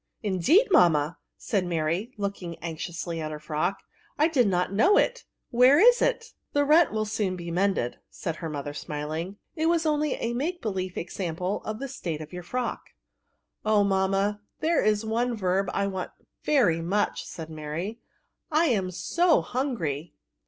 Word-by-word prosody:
*' -, -, -44 dB
Indeed, 215 Hz, -, +4 dB
mamma! 165 Hz, -, +4 dB
" -, -, -56 dB
said 200 Hz, -4 st, -1 dB
Mary, 170 Hz, +6 st, -1 dB
looking 195 Hz, -4 st, -4 dB
anxiously 165 Hz, 0 st, -5 dB
at 155 Hz, -, -3 dB
her 155 Hz, -, -5 dB
frock, 155 Hz, +5 st, -2 dB, 0.2 s
" -, -, -34 dB
I 310 Hz, +2 st, +4 dB
did 255 Hz, -8 st, +3 dB
not 180 Hz, 0 st, 0 dB
know 375 Hz, -, +5 dB
it; -, -, +1 dB, 0.3 s
where 250 Hz, +3 st, +6 dB
is 485 Hz, +7 st, +6 dB
it?" 475 Hz, -1 st, 0 dB, 0.2 s
The 290 Hz, 0 st, +3 dB
rent 315 Hz, +3 st, +5 dB
will 215 Hz, 0 st, 0 dB
be 215 Hz, -, -5 dB
soon 185 Hz, -5 st, -2 dB
mended," 185 Hz, -9 st, 0 dB
said 165 Hz, -2 st, -5 dB
her 165 Hz, -, -5 dB
mother, 145 Hz, -1 st, -5 dB
smiling; 155 Hz, +5 st, -4 dB
^^ -, -, -23 dB, 0.2 s
it 320 Hz, -1 st, +1 dB
was 335 Hz, -1 st, +2 dB
only 300 Hz, -2 st, +1 dB
a 235 Hz, -, -2 dB
make 325 Hz, +9 st, -2 dB
be 225 Hz, -, -2 dB
lief 185 Hz, -2 st, -4 dB
example 180 Hz, +2 st, -3 dB
of 215 Hz, 0 st, -3 dB
the 275 Hz, -, -5 dB
state 170 Hz, -, -4 dB
of 155 Hz, +2 st, -9 dB
your 180 Hz, -, -5 dB
frock." 245 Hz, +7 st, -3 dB
'^ -, -, -25 dB, 0.7 s
Oh, 215 Hz, -1 st, +4 dB
mamma, 195 Hz, +1 st, +1 dB, 0.2 s
there 330 Hz, +1 st, +2 dB
is 215 Hz, 0 st, +2 dB
one 235 Hz, +2 st, 0 dB
verb 190 Hz, -1 st, +1 dB
I 200 Hz, -, 0 dB
want 190 Hz, -2 st, -3 dB, 0.3 s
very 205 Hz, -, +3 dB
much," 200 Hz, +5 st, 0 dB
said 160 Hz, -1 st, -8 dB
Mary; 160 Hz, +8 st, -5 dB, 0.3 s
" -, -, -53 dB
I 315 Hz, +2 st, +4 dB
am 195 Hz, -6 st, +1 dB
so 330 Hz, -, +2 dB
hungry." 175 Hz, -, -3 dB
195 Hz, 185 wpm, -27 LUFS, 170-255 Hz, 0.7 s, where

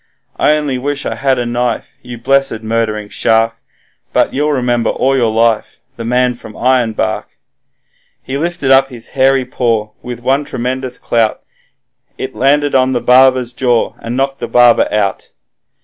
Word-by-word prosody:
I 150 Hz, -, +3 dB
only 140 Hz, -4 st, -2 dB
wish 140 Hz, +1 st, -3 dB
I -, -, -2 dB
had 135 Hz, -1 st, 0 dB
a 120 Hz, -, -1 dB
knife, 120 Hz, -1 st, -3 dB
you 120 Hz, -1 st, -9 dB
blessed 135 Hz, -2 st, +1 dB
murdering 110 Hz, -2 st, -1 dB
shark! 115 Hz, +2 st, +1 dB, 0.6 s
But -, -, +2 dB
you'll 150 Hz, +2 st, 0 dB
remember 120 Hz, -4 st, 0 dB
all 135 Hz, +1 st, +1 dB
your 120 Hz, -4 st, +2 dB
life, 115 Hz, -1 st, +1 dB, 0.2 s
the 115 Hz, -, -7 dB
man 125 Hz, +1 st, +1 dB
from 110 Hz, -2 st, -12 dB
Ironbark.' 125 Hz, -3 st, 0 dB, 1.0 s
He 130 Hz, -, -5 dB
lifted 165 Hz, -2 st, -1 dB
up 135 Hz, 0 st, +5 dB
his 120 Hz, -3 st, -9 dB
hairy 135 Hz, -1 st, +2 dB
paw, 115 Hz, -4 st, -1 dB
with 120 Hz, -1 st, -8 dB
one 135 Hz, +3 st, +1 dB
tremendous 130 Hz, 0 st, -4 dB
clout 115 Hz, -2 st, 0 dB, 0.7 s
He -, -, -3 dB
landed 140 Hz, +2 st, +1 dB
on 130 Hz, 0 st, +3 dB
the 120 Hz, -, +1 dB
barber's 130 Hz, -1 st, +4 dB
jaw, 120 Hz, -2 st, +1 dB
and 115 Hz, +2 st, -5 dB
knocked 135 Hz, 0 st, -1 dB
the -, -, -4 dB
barber 120 Hz, -1 st, +4 dB
out. 105 Hz, -2 st, -1 dB
125 Hz, 160 wpm, -14 LUFS, 115-135 Hz, 1.0 s, up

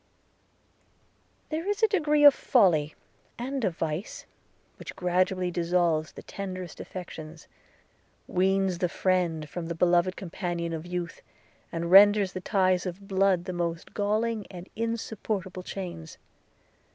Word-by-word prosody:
There 320 Hz, +4 st, -3 dB
is 410 Hz, +2 st, -1 dB
a -, -, +8 dB
degree 300 Hz, -7 st, +2 dB
of 290 Hz, -1 st, +10 dB
folly, 165 Hz, -, +3 dB, 0.4 s
and 265 Hz, +2 st, -3 dB
of 180 Hz, -5 st, -1 dB
vice, 160 Hz, +4 st, -4 dB, 0.5 s
which -, -, -9 dB
gradually 180 Hz, 0 st, +1 dB
dissolves 170 Hz, -2 st, +1 dB
the -, -, -10 dB
tenderest 185 Hz, -3 st, -6 dB
affections, 160 Hz, -3 st, -9 dB, 0.8 s
weans 190 Hz, -1 st, +1 dB
the 180 Hz, -, +1 dB
friend 170 Hz, -4 st, 0 dB
from 170 Hz, +1 st, -6 dB
the 170 Hz, -, -4 dB
beloved 175 Hz, +2 st, +3 dB
companion 170 Hz, -2 st, -4 dB
of 160 Hz, +1 st, -5 dB
youth, 175 Hz, -1 st, -4 dB, 0.5 s
and 170 Hz, +1 st, -3 dB
renders 200 Hz, 0 st, +7 dB
the 185 Hz, -, -5 dB
ties 185 Hz, -2 st, +1 dB
of 190 Hz, +3 st, -7 dB
blood 190 Hz, -2 st, +2 dB
the 185 Hz, -, -4 dB
most 170 Hz, 0 st, -3 dB
galling 215 Hz, +1 st, -1 dB
and 180 Hz, 0 st, -9 dB
insupportable 215 Hz, -4 st, -3 dB
chains. 175 Hz, -4 st, -7 dB
185 Hz, 125 wpm, -27 LUFS, 170-200 Hz, 0.8 s, of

